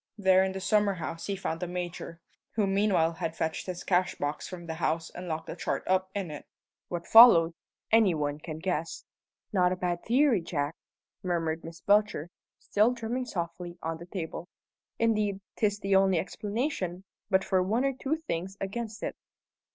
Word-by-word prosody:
There 190 -2 +5
in 190 - 0
the 190 - -4
summer 205 0 +2
house 165 -1 -5
he 200 - -1
found 165 -4 -3
the 180 - -3
Major, 175 -1 -5 0.3
who 215 -2 +2
meanwhile 195 -4 +2
had 165 -1 -4
fetched 160 +3 -2
his 180 -1 -5
cashbox 180 -5 0
from 175 -2 -8
the 165 - -4
house 160 0 -1
and 180 +1 -8
locked 160 -1 -3
the - - -6
chart - - -2
up 185 0 +1
in 190 -5 -3
it. 150 - -8 0.4
What 170 -1 -4
followed, 175 -8 +8 0.4
any 220 -6 +5
one 145 -1 -2
can 155 0 -6
guess." 165 -1 -3 0.5
"Not 180 -2 +4
a - - +1
bad 175 -1 -2
theory, 250 -3 +3
Jack!" 150 -2 -2 0.5
murmured 165 -3 -1
Miss 165 +1 -9
Belcher, 205 -5 +2 0.3
still 215 +4 +2
drumming 245 +2 -3
softly 175 -3 -5
on 160 0 -3
the 170 - -10
table. 175 -2 -5 0.5
"Indeed, 210 -3 +1 0.2
'tis 205 -2 +1
the 195 -1 +1
only 190 -1 +4
explanation, 200 - -2 0.3
but 190 -1 +3
for 190 -1 +2
one 220 +8 +1
or 275 - +1
two 270 +4 -1
things 180 +4 -3
against 215 +2 -4
it." - - -3
185 Hz, 175 wpm, -29 LUFS, 165-205 Hz, 0.5 s, followed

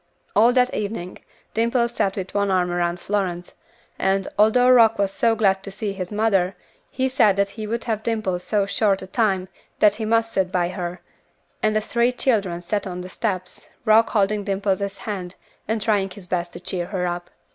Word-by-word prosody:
All 225 +4 +6
that 250 0 +3
evening 200 -4 -4 0.3
Dimple 235 +2 +2
sat 200 -5 -1
with 190 -2 -5
one 200 -1 +1
arm 180 -2 +1
around 175 0 -1
Florence; 180 -3 -2 0.5
and, 195 0 +1
although 220 +4 +4
Rock 230 -3 +6
was 200 -1 +1
so 225 +3 +2
glad 195 -3 +2
to 195 - -6
see 200 +1 -4
his 185 -1 -5
mother, 200 -4 +1 0.3
he 260 0 0
said 235 -7 +3
that 200 0 +1
he 215 +1 -6
would 230 +2 -2
have 220 -3 -2
Dimple 215 -6 -1
so 200 +2 0
short 200 -1 +1
a - - -6
time 190 -2 0 0.3
that 210 -1 +5
he 220 +1 -4
must 225 +1 +1
sit 190 -3 0
by 175 -2 +1
her, 180 -1 -5 0.6
and 215 0 +1
the 215 - +2
three 235 +3 +1
children 200 -9 0
sat 195 +3 -2
on 180 -1 -5
the 180 - -8
steps, 185 -3 -4 0.2
Rock 220 +1 +5
holding 205 -1 +1
Dimple's 200 0 -1
hand 190 -4 -5 0.3
and 220 +1 0
trying 200 -2 +1
his 185 0 -11
best 175 -1 -2
to - - -7
cheer 175 -1 -3
her 185 -3 -2
up. 175 0 -4
200 Hz, 195 wpm, -23 LUFS, 185-220 Hz, 0.6 s, All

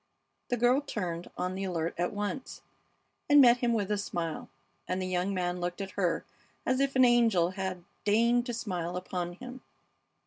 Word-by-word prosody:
The 245 - +1
girl 245 +4 +4
turned, 180 - -4
on 180 +1 -1
the 190 +1 -4
alert 170 -3 -2
at 175 +1 -1
once, 205 +6 -4 0.7
and 290 0 +8
met 245 -3 +8
him 240 -1 +1
with 210 -3 0
a 210 - +1
smile, 170 -5 -4 0.4
and 185 - -1
the 185 - -2
young 185 +1 0
man 180 -1 -1
looked 175 +2 -3
at 195 -1 -4
her 180 -4 0 0.4
as 255 0 +1
if 275 0 +1
an 260 -1 +7
angel 225 -8 +4
had 190 -2 -4 0.2
deigned 235 +4 +3
to 240 - -2
smile 180 -5 -3
upon 180 -1 -4
him. 250 +7 -9
195 Hz, 180 wpm, -30 LUFS, 180-240 Hz, 0.7 s, and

